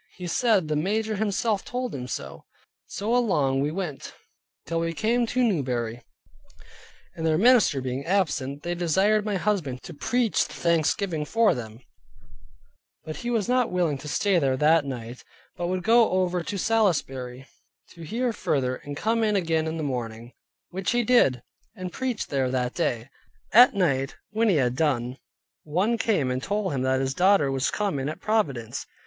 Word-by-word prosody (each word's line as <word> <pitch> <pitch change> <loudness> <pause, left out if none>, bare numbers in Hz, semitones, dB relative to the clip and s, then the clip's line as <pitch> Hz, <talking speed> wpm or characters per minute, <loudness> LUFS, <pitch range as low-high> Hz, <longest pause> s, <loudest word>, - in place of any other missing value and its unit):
He 180 - -7
said 195 -1 +2
the 155 - -1
major 215 +7 0
himself 210 0 0
told 250 0 -4
him 125 -2 -5
so. - - -6 0.4
So 220 +4 -2
along 145 - +2
we 145 - 0
went 160 -4 -5 0.5
till 165 0 -2
we 165 0 -1
came 235 +4 +1
to 250 +2 +1
Newbury; 125 - -1 1.1
and 165 - -6
their 160 -1 +2
minister 230 - +4
being 130 +1 -3
absent, 150 -6 -1
they 175 - -2
desired 190 +5 +2
my 210 -2 -1
husband 175 -10 -1
to 175 - -9
preach 235 +9 0
the - - -11
thanksgiving 170 0 0
for 225 +7 +3
them; 115 -1 -8 1.2
but 155 - -6
he 240 - -4
was 225 -4 0
not 250 0 +2
willing 170 -6 0
to 150 - -9
stay 190 +4 +2
there 135 -3 +1
that 155 +1 +4
night, 125 -2 -7 0.3
but 175 -2 -3
would 185 0 -2
go 230 +2 +5
over 180 -1 0
to 200 +4 -4
Salisbury, 135 - 0 0.4
to 170 - -14
hear 230 +8 -2
further, 130 -9 -1
and 145 0 -8
come 225 +5 0
again 170 -7 +1
in 160 +1 -3
the 160 - -3
morning, 120 -3 -5 0.4
which 190 +4 -2
he 240 0 +2
did, 170 - +3 0.3
and 185 -3 -6
preached 255 -4 -3
there 135 -2 +1
that 125 -1 -1
day. 120 0 -1 0.5
At 240 +1 +8
night, 135 -8 0 0.2
when 220 +1 +2
he 190 - +3
had 125 -4 +1
done, 130 -4 0 0.4
one 190 +10 0
came 175 - +1
and 130 0 -2
told 200 +1 -2
him 130 - -1
that 130 0 +1
his 135 0 -1
daughter 180 -4 +3
was 135 0 0
come 200 -9 -1
in 135 +2 -2
at 155 - -6
Providence. 140 - -1
170 Hz, 175 wpm, -25 LUFS, 135-210 Hz, 1.2 s, At